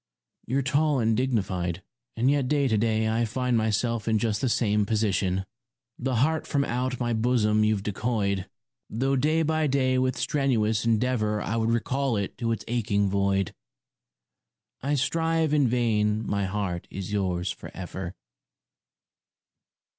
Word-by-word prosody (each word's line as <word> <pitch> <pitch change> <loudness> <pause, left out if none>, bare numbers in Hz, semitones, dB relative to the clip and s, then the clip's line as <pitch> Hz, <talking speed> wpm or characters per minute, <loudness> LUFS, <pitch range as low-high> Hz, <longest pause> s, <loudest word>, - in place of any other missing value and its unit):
You're 135 +2 0
tall 145 +2 +2
and 115 -1 +2
dignified, 95 -8 -1 0.3
and 125 +4 +3
yet 140 -3 +1
to 145 -2 +2
day 110 0 +1
I 110 +2 +1
find 125 +2 0
myself 110 +1 0
in 110 -1 +3
just 110 -1 -1
the 130 - +1
same 105 -3 +2
position. 95 -3 0 0.5
The 130 0 -1
heart 155 +7 +1
from 140 -1 +1
out 125 +1 -2
my 120 -1 0
bosom 110 -2 +2
you've 105 -2 +1
decoyed, 100 -2 -1 0.4
Though 135 +5 0
day 155 +5 +2
by 155 0 +1
day 130 -2 +2
with 130 0 0
strenuous 115 -6 +1
endeavour 110 -2 +1
I 110 - -2
would 115 0 +1
recall 125 +1 0
it 100 -1 -3
to 115 -2 0
its 115 - -3
aching 105 -4 +1
void. 100 -1 +1 1.3
I 145 +3 0
strive 160 +2 +1
in 145 -3 +4
vain 110 -3 +1
my 100 -1 0
heart 95 -3 -3
is 95 +1 -6
yours 95 -2 0
for - - -9
ever. 95 -1 -6
115 Hz, 145 wpm, -26 LUFS, 105-130 Hz, 1.3 s, in